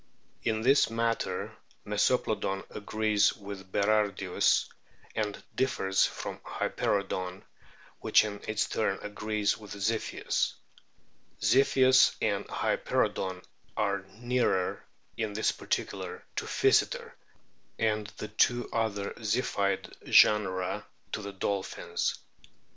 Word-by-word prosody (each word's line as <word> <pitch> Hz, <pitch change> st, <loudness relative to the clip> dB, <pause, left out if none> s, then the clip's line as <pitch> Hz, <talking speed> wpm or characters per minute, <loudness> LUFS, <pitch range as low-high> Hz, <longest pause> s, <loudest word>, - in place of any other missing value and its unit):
In 110 Hz, -1 st, 0 dB
this 135 Hz, +1 st, +5 dB
matter 115 Hz, 0 st, -1 dB, 0.3 s
Meso -, -, +3 dB
plodon 95 Hz, 0 st, -2 dB
agrees 105 Hz, 0 st, +1 dB
with 100 Hz, -2 st, -9 dB
Berardius, 100 Hz, -3 st, +2 dB, 0.5 s
and 105 Hz, -2 st, -2 dB
differs 95 Hz, -7 st, +2 dB
from -, -, -6 dB
Hyperoodon, 95 Hz, -2 st, -2 dB, 0.6 s
which -, -, +4 dB
in 100 Hz, -1 st, -6 dB
its 110 Hz, -1 st, 0 dB
turn 100 Hz, -3 st, 0 dB
agrees 105 Hz, 0 st, -1 dB
with 105 Hz, -2 st, -9 dB
Ziphius. 110 Hz, +3 st, -1 dB, 0.9 s
Ziphius 130 Hz, -1 st, +5 dB
and -, -, 0 dB
Hyperoodon 95 Hz, -1 st, -1 dB, 0.3 s
are 100 Hz, -2 st, +1 dB
nearer 120 Hz, -5 st, 0 dB, 0.3 s
in 110 Hz, -3 st, -2 dB
this 110 Hz, +2 st, +1 dB
particular -, -, -4 dB
to -, -, -1 dB
Physeter, -, -, +2 dB, 0.7 s
and 110 Hz, -2 st, 0 dB
the 110 Hz, -, -5 dB
two 120 Hz, +3 st, +2 dB
other 110 Hz, -3 st, -1 dB
Ziphioid 105 Hz, -3 st, 0 dB, 0.2 s
genera 95 Hz, -4 st, +4 dB, 0.3 s
to 110 Hz, -, -3 dB
the 100 Hz, -1 st, -6 dB
dolphins. 95 Hz, 0 st, -2 dB
105 Hz, 100 wpm, -29 LUFS, 100-110 Hz, 0.9 s, this